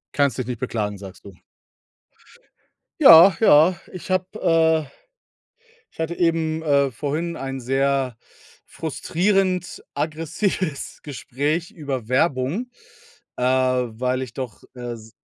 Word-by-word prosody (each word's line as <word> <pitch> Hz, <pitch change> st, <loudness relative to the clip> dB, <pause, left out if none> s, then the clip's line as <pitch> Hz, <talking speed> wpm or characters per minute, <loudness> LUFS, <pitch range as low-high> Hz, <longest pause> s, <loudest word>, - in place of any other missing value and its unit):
Kannst 140 Hz, -2 st, +2 dB
dich 130 Hz, -, -2 dB
nicht 125 Hz, -2 st, -5 dB
beklagen, 105 Hz, -5 st, -2 dB
sagst 95 Hz, 0 st, -12 dB
du. 100 Hz, -2 st, -11 dB, 1.7 s
Ja, 170 Hz, +3 st, +9 dB
ja, 165 Hz, -3 st, +6 dB, 0.2 s
ich 185 Hz, 0 st, -9 dB
habe, 185 Hz, 0 st, +1 dB
äh 160 Hz, -1 st, +3 dB, 1.1 s
ich -, -, -26 dB
hatte 165 Hz, +1 st, -2 dB
eben, 160 Hz, -2 st, 0 dB
äh, 140 Hz, -3 st, +2 dB
vorhin 150 Hz, +7 st, -3 dB
ein 135 Hz, 0 st, -5 dB
sehr 135 Hz, -1 st, 0 dB, 0.5 s
frustrierend 180 Hz, +3 st, -1 dB
aggressives 165 Hz, +1 st, -3 dB
Gespräch 145 Hz, +4 st, -3 dB
über 135 Hz, -7 st, -5 dB
Werbung. 140 Hz, -, 0 dB, 0.7 s
Äh, -, -, -2 dB
weil 130 Hz, -1 st, +1 dB
ich 125 Hz, -3 st, -6 dB
doch, 125 Hz, -5 st, -7 dB
äh, 120 Hz, -1 st, -5 dB
se 110 Hz, 0 st, -15 dB
140 Hz, 115 wpm, -22 LUFS, 125-165 Hz, 1.7 s, Ja